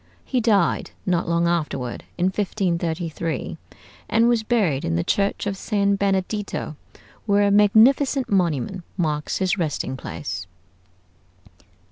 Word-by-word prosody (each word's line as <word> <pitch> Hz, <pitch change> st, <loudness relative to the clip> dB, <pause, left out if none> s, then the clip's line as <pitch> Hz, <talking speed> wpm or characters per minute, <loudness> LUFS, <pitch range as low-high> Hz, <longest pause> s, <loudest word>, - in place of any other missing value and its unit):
He 255 Hz, -2 st, 0 dB
died 205 Hz, -6 st, +2 dB, 0.2 s
not 175 Hz, -2 st, 0 dB
long 170 Hz, 0 st, +2 dB
afterward, 150 Hz, -7 st, -2 dB
in 180 Hz, -, +1 dB
1533, 170 Hz, -, -2 dB, 0.5 s
and 230 Hz, +1 st, +4 dB
was 240 Hz, -2 st, +3 dB
buried 210 Hz, -, +1 dB
in 80 Hz, -, -1 dB
the 85 Hz, -, +1 dB
church 200 Hz, 0 st, 0 dB
of 200 Hz, -1 st, -1 dB
San 200 Hz, 0 st, +1 dB
Benedetto, 195 Hz, -3 st, -2 dB, 0.5 s
where 205 Hz, 0 st, +4 dB
a 200 Hz, -, +3 dB
magnificent 240 Hz, +7 st, +4 dB
monument 175 Hz, -, 0 dB
marks 150 Hz, -4 st, -1 dB
his 190 Hz, +1 st, 0 dB
resting 145 Hz, -5 st, -2 dB
place. 90 Hz, -4 st, -6 dB
185 Hz, 120 wpm, -23 LUFS, 160-205 Hz, 0.5 s, and